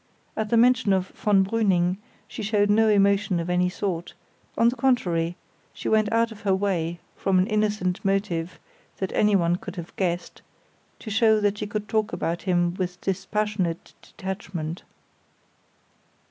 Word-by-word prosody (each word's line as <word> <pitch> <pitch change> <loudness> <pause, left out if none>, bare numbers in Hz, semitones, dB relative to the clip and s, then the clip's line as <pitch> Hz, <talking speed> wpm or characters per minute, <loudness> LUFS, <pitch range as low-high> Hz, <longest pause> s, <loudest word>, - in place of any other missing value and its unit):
At 220 -1 -2
the 235 - +3
mention 235 -4 +4
of 185 -1 0
von 200 -2 +2
Brüning 190 -4 +1 0.3
she - - -7
showed 205 -1 +2
no 220 +1 +4
emotion 200 -3 +3
of 170 +1 -3
any 180 0 +2
sort; 180 -2 -4 0.4
on 230 - +5
the 245 - -3
contrary, 175 -10 +1 0.4
she - - -6
went 215 -1 +2
out 230 0 +2
of 215 - -11
her 195 -2 +2
way, 175 -4 -1 0.2
from 195 -1 +1
an 185 - +4
innocent 210 -4 0
motive 195 -4 -1 0.4
that 190 - -3
anyone 180 -5 +3
could 190 -2 -8
have 170 -2 -8
guessed, 175 -2 -2 0.6
to 215 - -8
show 220 0 +4
that 205 0 +1
she 210 - -3
could 210 0 -4
talk 215 -1 0
about 170 -1 -2
him 175 -2 +1
with 180 -1 -3
dispassionate 195 -2 -2
detachment. 185 -5 -6
195 Hz, 155 wpm, -25 LUFS, 180-215 Hz, 0.6 s, on